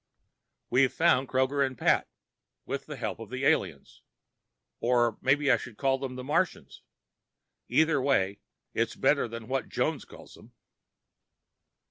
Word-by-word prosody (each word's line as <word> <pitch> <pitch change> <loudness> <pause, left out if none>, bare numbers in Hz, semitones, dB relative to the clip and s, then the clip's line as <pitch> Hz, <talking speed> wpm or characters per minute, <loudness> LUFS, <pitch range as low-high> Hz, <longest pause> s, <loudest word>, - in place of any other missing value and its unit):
We've 130 +1 +4
found 160 -6 +2
Kroger 130 +2 +1
and 130 -2 -3
Pat, - - +2 0.6
with 140 0 -5
the 150 - -6
help 115 -5 -4
of 115 -2 -9
the 130 +2 -3
aliens. 80 - 0 0.8
Or 120 -2 +1
maybe 140 +1 +3
I - - +5
should 120 -3 -10
call 135 -1 +1
them 130 -1 -5
the 125 - -6
Martians. 160 +5 -1 0.9
Either 160 -3 +3
way, 100 -8 +1 0.3
it's - - -1
better - - +2
than 115 -1 -8
what 135 +1 -2
Jones - - -1
calls - - -14
them. - - -17
130 Hz, 140 wpm, -28 LUFS, 120-140 Hz, 0.9 s, I